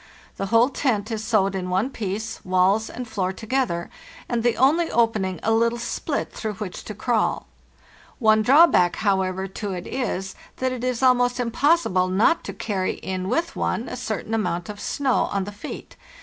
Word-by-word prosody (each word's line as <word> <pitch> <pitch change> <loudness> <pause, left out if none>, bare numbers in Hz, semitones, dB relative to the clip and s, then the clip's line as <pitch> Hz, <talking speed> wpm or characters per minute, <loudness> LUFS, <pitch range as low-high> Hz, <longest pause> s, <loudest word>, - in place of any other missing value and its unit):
The 195 - -2
whole 230 +5 +4
tent 230 -6 -1
is 220 -1 -3
sewed 210 -3 +2
in 185 -1 -3
one 190 +9 0
piece, 220 0 -4
walls 185 +4 +2
and 250 0 -6
floor 195 -4 -1
together, 220 -4 -2 0.4
and 240 -2 -1
the 235 -1 +1
only 310 +7 +3
opening 215 -6 +1
a 225 - +1
little 230 +1 +2
split 235 - -3
through 215 -2 -4
which 190 -3 -6
to 215 - -6
crawl. 225 +1 0 0.7
One 215 -3 +4
drawback, 260 - +5
however, 190 -2 0
to 195 +1 -5
it 180 -1 -5
is, 195 -7 -3 0.2
that 260 0 0
it 250 -1 -5
is 255 0 -1
almost 245 -1 +3
impossible 245 - +2
not 200 - +2
to - - -4
carry 190 -4 -2
in 185 0 -4
with 335 +7 -1
one 235 - -1
a - - -5
certain 225 -3 -4
amount 175 -6 -1
of 205 -1 -7
snow 270 -3 0
on 200 -1 0
the 205 - -6
feet. 205 - -9
220 Hz, 180 wpm, -23 LUFS, 190-245 Hz, 0.7 s, drawback